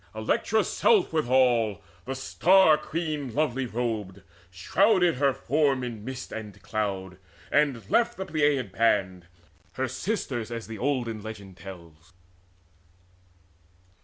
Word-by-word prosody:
Electra's - - +1
self 420 - +3
withal, 125 - +2 0.2
The 135 +2 -4
Star 170 +5 +4
queen 150 -4 -4
lovely 135 -4 0
robed, 110 -5 -3 0.3
shrouded 175 - +2
her 140 0 +3
form 135 0 +1
In 115 -4 -6
mist 130 +1 -7
and 105 -3 -7
cloud, 95 -2 -3 0.3
and 140 -8 +1
left 235 - +2
the 190 - -4
Pleiad 145 - +1
band, 95 -5 +1 0.5
Her 130 0 -1
sisters, 130 - -3
as 115 -1 -5
the 110 -2 -8
olden 120 -5 -1
legend 100 -3 -9
tells. 85 -2 -12
120 Hz, 115 wpm, -27 LUFS, 105-145 Hz, 0.5 s, Star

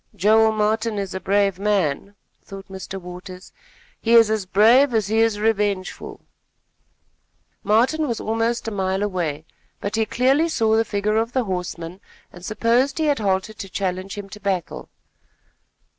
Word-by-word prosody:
"Joel 220 +3 +4
Martin 215 +1 0
is 195 -2 -4
a 190 - -3
brave 195 -1 +1
man," 200 -2 -1 0.3
thought 195 0 -11
Mr. 190 0 -7
Waters. 180 +1 -10 0.5
"He 230 - +1
is 225 -2 +6
as 215 -4 -1
brave 235 +7 +5
as 215 -2 +2
he 220 +1 +2
is 225 -2 +2
revengeful." 205 -3 -2 1.4
Martin 250 +9 +2
was 235 -3 -2
almost 225 +1 -1
a - - -2
mile 190 -1 -1
away; 165 -7 -3 0.3
but 200 +2 -3
he 220 -1 +1
clearly 270 +8 +2
saw 220 -7 +2
the 225 - +3
figure 210 +1 -1
of 230 +2 -1
the 255 - +1
horseman 180 -2 -5 0.3
and 175 - -13
supposed 235 +6 +1
he 320 - 0
had 290 -3 +1
halted 200 +1 -1
to 195 - -6
challenge 185 +1 -3
him 200 -1 -6
to 210 - -10
battle. 190 -3 -3
210 Hz, 160 wpm, -22 LUFS, 190-225 Hz, 1.4 s, is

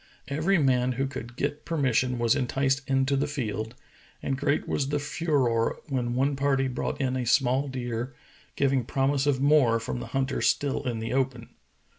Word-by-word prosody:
Every 160 +8 +1
man 130 -4 +2
who 135 +2 -1
could 120 -3 -7
get 145 +3 -2
per 165 - -3
mission 125 -2 +1
was 120 -1 +3
enticed 135 +2 +1
into 135 +1 +2
the 140 +2 +1
field, 115 -5 -3 0.5
and 135 - 0
great 145 +2 0
was 140 -2 -1
the 145 - +1
furore 140 -6 0
when 120 -3 -1
one 135 +2 +1
party 135 -1 +1
brought 125 - -3
in 130 -2 0
a 130 - -1
small 130 +2 +2
deer, 120 -1 -4 0.4
giv 135 -1 +2
ing 130 -4 +1
promise 135 +2 +1
of 140 -3 +2
more 140 -6 +4
from 115 +1 -4
the 120 - -6
hunters 135 +2 0
still 140 -1 0
in 120 -2 -1
the 115 +1 -3
open. 130 -3 -1
135 Hz, 185 wpm, -27 LUFS, 125-140 Hz, 0.5 s, more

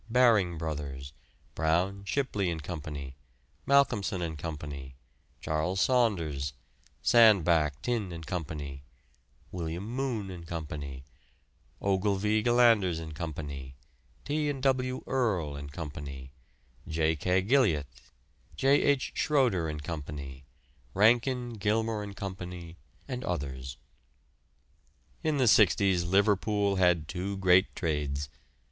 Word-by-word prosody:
Baring 110 -8 +4
Brothers; 70 -4 -5 0.4
Brown, 90 +5 0
Shipley 105 -6 0
and 80 -3 -4
Co.; 85 -1 -5 0.9
Malcolmson 105 -10 +3
and 80 -2 -3
Co.; 80 0 -5 0.8
Charles 80 +5 -1
Saunders; 85 - +1 0.5
Sandbach, 85 - +5
Tinne 115 -7 -1
and 80 -1 -7
Co.; 85 +1 -2 1.1
Wm. 85 0 -4
Moon 120 -5 -2
and 85 -2 -9
Co.; 85 -2 -4 1.2
Ogilvy, 100 +2 +1
Gillanders 115 -7 +4
and 80 -1 -7
Co.; 80 +1 -4 0.9
T. 150 +1 0
and 135 -2 -4
W. 130 -1 +1
Earle 100 - 0
and 70 0 -7
Co.; 75 0 -6 1.0
J. 80 -1 +1
K. 90 +5 +1
Gilliat; 105 - +3 0.7
J. 135 +2 +4
H. 140 -2 +1
Schroeder 120 - +2
and 75 -1 -5
Co.; 80 -1 -4 0.9
Rankin, 120 +4 +3
Gilmour 110 +1 0
and 100 -1 -7
Co., 95 -1 -4 0.7
and 125 -2 -4
others. 65 -6 -4 1.5
In 155 -2 +1
the 130 -3 +3
'sixties 100 -5 +4
Liverpool 100 +1 +2
had 90 -4 +3
two 95 +3 -4
great 95 0 +4
trades. 75 -4 -2
95 Hz, 105 wpm, -29 LUFS, 80-115 Hz, 1.5 s, Sandbach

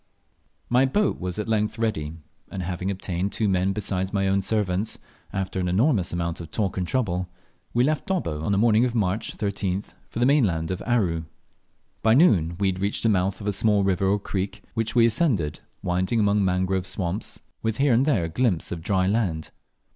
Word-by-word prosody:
MY 125 +2 +4
boat 205 +9 +1
was 90 -1 -4
at 105 - -3
length 110 0 0
ready, 80 -10 -1 0.4
and 95 - -4
having 90 +1 -3
obtained 95 0 -2
two 110 - 0
men 95 0 +2
besides 95 -2 -2
my 95 -2 +1
own 95 +1 +2
servants, 100 0 -1 0.3
after 95 -1 -2
an 90 - 0
enormous 100 - +2
amount 85 0 -2
of 85 - -8
talk 100 -4 -1
and 90 -2 -2
trouble, 90 -8 -1 0.4
we 120 - +2
left 150 +2 0
Dobbo 165 - -1
on 80 - -1
the 100 - +2
morning 110 +1 +4
of 125 -1 0
March 105 -1 -1
13th, 100 -2 -2 0.2
for - - -8
the 120 - +3
mainland 95 - +2
of 90 - -3
Aru. 90 -10 +1 0.8
By 110 0 +4
noon 90 - +4
we 100 -1 +2
reached 95 +3 -2
the 115 - +4
mouth 95 0 +1
of 100 - -5
a 105 - +1
small 105 0 +3
river 95 0 +1
or 100 +2 +3
creek, 100 -1 -4
which 115 0 -2
we 115 -1 +6
ascended, 115 - +1 0.2
winding 90 +6 0
among 105 -1 +3
mangrove, 95 0 0
swamps, 95 +2 -3 0.2
with 110 -1 -1
here 140 -2 +3
and 120 +3 +4
there 135 - +2
a - - -1
glimpse 95 -1 0
of 85 - -4
dry 95 +1 +1
land. 95 -6 -1
100 Hz, 195 wpm, -25 LUFS, 90-110 Hz, 0.8 s, we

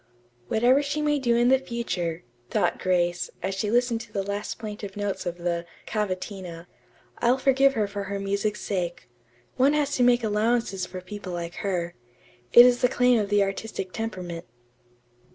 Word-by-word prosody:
"Whatever 245 - +4
she 290 +1 -2
may 295 -1 +1
do 240 -3 +2
in 240 +2 +5
future," 185 -10 -3 0.3
thought - - +1
Grace, 175 -1 +1
as 190 +1 -1
she 200 +2 -2
listened 240 0 +2
to 235 -3 -12
the 200 -2 -2
last 200 +1 -4
plaintive 210 -2 -7
notes 205 -2 -3
of 175 0 -3
the 170 -1 -2 0.2
"Cavatina," 185 -4 -4 0.5
"I'll 245 +2 +3
forgive 270 0 +3
her 215 -2 +2
for 200 0 -5
her 200 +1 -3
music's 200 +2 -1
sake. 175 -4 -3 0.5
One 270 +3 +4
has 290 -1 +1
to 250 - +3
make 245 0 +4
allowances 215 -3 0
for 185 - -7
people 190 0 -7
like 170 0 -5
her. 175 -3 -2 0.6
It 240 - +10
is 245 -1 +4
the 250 - +4
claim 250 -2 +3
of 205 -2 -1
the 205 -1 +4
artistic 195 -1 -4
temperament." 185 -7 -5
205 Hz, 170 wpm, -26 LUFS, 185-240 Hz, 0.6 s, It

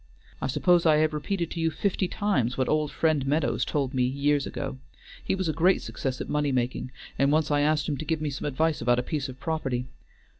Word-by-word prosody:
I - - 0
suppose 175 +6 +3
I 155 - +6
have 155 0 +2
repeated 170 +3 -2
to 170 - -4
you 165 0 +2
fifty 190 +2 -1
times 140 - 0
what 130 - +1
old 155 -1 +1
Friend 155 -2 +1
Meadows 150 +2 +1
told 140 -2 -1
me 130 - +1
years 140 +3 +1
ago; 135 -1 -5 0.4
he - - 0
was 190 -2 -2
a 155 - 0
great 180 +4 +3
success 130 -1 -4
at - - -4
money 150 -1 0
making, 125 0 -1 0.3
and 140 +1 +4
once 155 0 +2
I 145 0 +3
asked 150 0 +2
him 145 - -1
to 155 - -5
give 160 +1 0
me 150 -1 -2
some 135 - -5
advice 155 +3 0
about 120 +1 +3
a 125 - 0
piece 145 +1 -3
of 130 0 -10
property. 135 -7 -2
150 Hz, 230 wpm, -27 LUFS, 135-160 Hz, 0.4 s, I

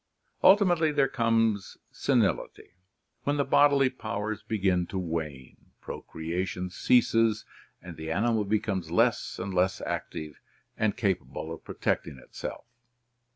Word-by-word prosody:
Ultimately 180 -5 +5
there 145 -2 +3
comer, 115 -4 +2 0.3
senility, - - 0 0.5
when 145 +1 0
the 140 - +1
bodily 140 -1 +4
powers 110 -3 -4
begin 95 -5 0
to 95 - -5
wane, 80 -7 -4 0.2
pro - - -7
creation 90 +3 -4
ceases, 115 0 +3 0.4
and 85 -3 -9
the 80 0 -6
animal 110 +5 +1
becomes 100 -2 -1
less - - +1
and 95 +1 -4
less 95 +1 +1
active 75 -2 -5 0.4
and 110 -2 0
capable 90 -5 -2
of 80 - -10
pro - - -8
tecting 70 - -1
itself. - - -8
100 Hz, 125 wpm, -28 LUFS, 90-115 Hz, 0.5 s, Ultimately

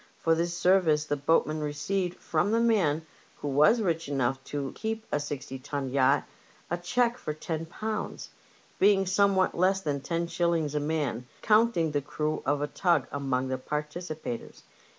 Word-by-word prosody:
For 165 - +2
this 170 +1 -1
service 175 -5 +3
the 145 - 0
boat 145 +3 +3
men 155 0 -3
received 170 +5 -2
from 160 +4 0
the 225 +2 +2
man 180 -10 +2 0.3
who 145 - -6
was 155 - +4
rich 165 -5 -1
enough 135 -1 0
to 140 -2 -3
keep 220 0 -4
a 150 - +1
sixty 140 -2 -5
ton 135 0 -4
yacht 130 -1 +3 0.5
a 175 - +1
cheque 235 +7 +1
for 150 - -4
£10! 160 +1 -4 0.9
— - - -30
^being 195 -1 +5
somewhat 195 0 +3
less 190 +2 +3
than 145 -5 -2
IO5. 170 -1 0
a 150 - +1
man, 145 -5 -2 0.2
counting 215 -7 +3
the 145 -1 0
crew 150 +2 -2
of 145 0 +1
a - - 0
tug 170 -3 +1
among 135 -2 -1
the 130 0 -2
participators. 150 -2 -5
155 Hz, 165 wpm, -28 LUFS, 145-185 Hz, 0.9 s, ^being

